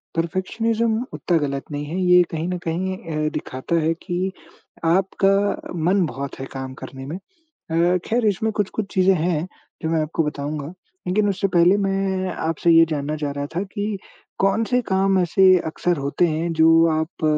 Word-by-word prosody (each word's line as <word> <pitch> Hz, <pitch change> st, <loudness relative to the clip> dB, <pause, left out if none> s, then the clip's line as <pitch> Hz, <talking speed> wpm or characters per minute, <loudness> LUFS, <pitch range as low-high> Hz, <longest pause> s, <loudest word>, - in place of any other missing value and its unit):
Perfectionism 220 Hz, +7 st, 0 dB
उतना 175 Hz, -2 st, 0 dB
गलत 140 Hz, 0 st, -4 dB
नहीं 145 Hz, 0 st, -3 dB
है, 170 Hz, +5 st, -4 dB
ये 180 Hz, 0 st, +6 dB
कहीं 160 Hz, +1 st, -3 dB
न 180 Hz, -, -2 dB
कहीं 185 Hz, +3 st, -2 dB, 0.3 s
अ, -, -, +1 dB
दिखाता 130 Hz, +6 st, -3 dB
है 160 Hz, +1 st, +1 dB
कि 180 Hz, +2 st, -3 dB, 0.5 s
आपका 195 Hz, +3 st, +1 dB
मन 190 Hz, 0 st, +3 dB
बहुत 140 Hz, -3 st, -6 dB
है 135 Hz, -, -4 dB
काम 130 Hz, -1 st, -5 dB
करने 135 Hz, -1 st, -8 dB
में। 155 Hz, +6 st, -5 dB, 0.3 s
अ, 175 Hz, -, 0 dB
खैर, 230 Hz, 0 st, +1 dB
इसमें 215 Hz, +2 st, +1 dB
कुछ-कुछ 205 Hz, 0 st, -3 dB
चीज़ें 190 Hz, 0 st, +4 dB
हैं, 165 Hz, -1 st, 0 dB, 0.4 s
जो 160 Hz, -, -1 dB
मैं 165 Hz, -, +2 dB
आपको 155 Hz, +2 st, -1 dB
बताऊँगा। 150 Hz, +1 st, -4 dB, 0.3 s
लेकिन 205 Hz, +3 st, +2 dB
उससे 195 Hz, 0 st, 0 dB
पहले 175 Hz, +2 st, +4 dB
मैं 195 Hz, -1 st, -1 dB
आपसे 165 Hz, +1 st, 0 dB
ये 165 Hz, 0 st, +7 dB
जानना 150 Hz, 0 st, -2 dB
चाह 150 Hz, -1 st, -3 dB
रहा 145 Hz, 0 st, -4 dB
था 185 Hz, -, +1 dB
कि 205 Hz, +1 st, -3 dB, 0.4 s
कौन 195 Hz, +4 st, +2 dB
से 250 Hz, +2 st, +1 dB
काम 190 Hz, 0 st, +2 dB
ऐसे 180 Hz, +2 st, +2 dB, 0.2 s
अक्सर 175 Hz, +2 st, -1 dB
होते 140 Hz, +5 st, +1 dB
हैं, 165 Hz, +2 st, -1 dB
जो 165 Hz, +1 st, +5 dB
आप 160 Hz, +1 st, -2 dB
175 Hz, 175 wpm, -22 LUFS, 160-195 Hz, 0.5 s, ये